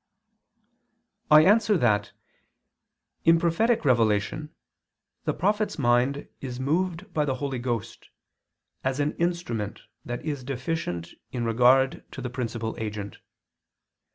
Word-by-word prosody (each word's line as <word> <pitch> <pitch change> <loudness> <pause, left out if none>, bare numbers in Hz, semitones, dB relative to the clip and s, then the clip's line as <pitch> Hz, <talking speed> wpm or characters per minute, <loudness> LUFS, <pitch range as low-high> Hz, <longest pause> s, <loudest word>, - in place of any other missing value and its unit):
I 155 +1 +8
answer 210 +1 +4
that, 105 -8 +2 1.1
In 165 0 +6
prophetic 215 +6 +2
revelation 120 +4 +2 0.8
the - - +1
prophet's 210 +3 0
mind 125 +2 +2
is 125 -2 -6
moved 175 +6 -1
by 150 - +2
the 135 -3 -1
Holy 135 -1 -3
Ghost, 120 -4 -4 0.7
as 130 +1 -1
an 145 +1 +1
instrument 170 - -2 0.2
that 120 +4 -5
is 145 -4 -3
deficient 125 - -3 0.2
in 120 -2 -2
regard 125 +3 +4
to 135 - -6
the 125 - -4
principal 115 -3 -3
agent. 105 -2 -5
135 Hz, 115 wpm, -26 LUFS, 120-165 Hz, 1.1 s, I